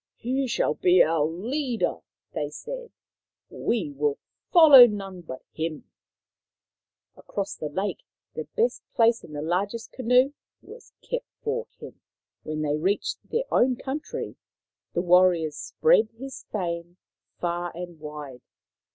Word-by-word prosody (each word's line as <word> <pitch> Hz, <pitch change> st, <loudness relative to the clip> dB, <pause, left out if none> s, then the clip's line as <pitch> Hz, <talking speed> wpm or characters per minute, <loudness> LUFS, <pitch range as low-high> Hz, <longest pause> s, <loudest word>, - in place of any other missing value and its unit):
" -, -, -67 dB
He 260 Hz, +3 st, -1 dB
shall 230 Hz, -, +1 dB
be 180 Hz, +3 st, +5 dB
our 160 Hz, -1 st, +1 dB
leader," 235 Hz, -, -1 dB, 0.4 s
they -, -, -2 dB
said. -, -, -7 dB, 0.3 s
" -, -, -65 dB
We 200 Hz, -11 st, -1 dB
will 145 Hz, 0 st, 0 dB, 0.3 s
follow 295 Hz, -8 st, +10 dB
none 195 Hz, -4 st, -6 dB
but 130 Hz, -6 st, -9 dB
him." 160 Hz, -1 st, -5 dB, 1.2 s
Across 200 Hz, -1 st, -5 dB
the 155 Hz, -, -4 dB
lake 190 Hz, +7 st, -3 dB, 0.3 s
the -, -, -5 dB
best 465 Hz, +2 st, +1 dB
place 230 Hz, 0 st, +4 dB
in 155 Hz, -, -12 dB
the 145 Hz, 0 st, -4 dB
largest 200 Hz, +7 st, -2 dB
canoe 255 Hz, +2 st, +3 dB, 0.3 s
was 475 Hz, +2 st, -13 dB
kept -, -, -4 dB, 0.2 s
for 470 Hz, +1 st, -2 dB
him. -, -, -11 dB, 0.4 s
When 155 Hz, 0 st, -4 dB
they 150 Hz, 0 st, 0 dB
reached 190 Hz, +6 st, 0 dB
their 470 Hz, -, 0 dB
own 255 Hz, 0 st, +4 dB
country 275 Hz, +5 st, -5 dB, 0.6 s
the 175 Hz, -, 0 dB
warriors 175 Hz, -4 st, +4 dB
spread 470 Hz, -, +3 dB
his 270 Hz, +2 st, -8 dB
fame 175 Hz, -3 st, -3 dB, 0.4 s
far 175 Hz, 0 st, -2 dB
and 175 Hz, -2 st, -7 dB
wide. 150 Hz, -4 st, -8 dB
190 Hz, 135 wpm, -26 LUFS, 160-260 Hz, 1.2 s, follow